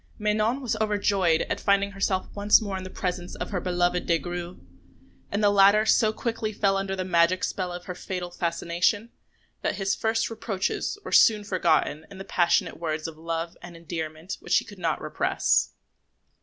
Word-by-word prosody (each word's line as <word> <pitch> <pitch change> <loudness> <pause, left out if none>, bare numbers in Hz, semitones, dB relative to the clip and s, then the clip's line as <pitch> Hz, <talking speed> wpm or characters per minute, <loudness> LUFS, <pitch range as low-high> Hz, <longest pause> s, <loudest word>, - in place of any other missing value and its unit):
Manon 215 +4 0
was 250 -5 -1
overjoyed 200 -6 +2
at - - -3
finding 200 0 +2
herself 195 -1 -1
once 205 0 +5
more 200 -3 -4
in 190 - -5
the 185 - -7
presence 180 -1 -4
of - - -5
her 190 - -1
beloved 180 0 0
Des 170 - +3
Grieux; 175 +3 -6 0.7
and 205 +1 -1
the 205 - +5
latter 200 +2 +5
so 220 0 +4
quickly 225 -1 -3
fell 200 -2 +1
under 195 0 -2
the 185 -1 -3
magic 175 +1 +3
spell 185 -2 -2
of 175 0 -7
her 180 - -5
fatal 180 -1 -5
fascination, 175 +6 -1 0.5
that - - -1
his 195 -1 0
first 225 +1 0
reproaches 215 - -2
were - - -6
soon 215 -2 +5
forgotten 165 -5 +1
in 200 - -11
the 195 - -7
passionate 175 -3 +1
words 155 -1 -2
of 165 - -8
love 165 +1 -4
and 175 -1 -10
endearment 160 +1 -6
which - - +2
he - - 0
could - - -12
not - - 0
repress. - - +1
185 Hz, 185 wpm, -26 LUFS, 175-205 Hz, 0.7 s, once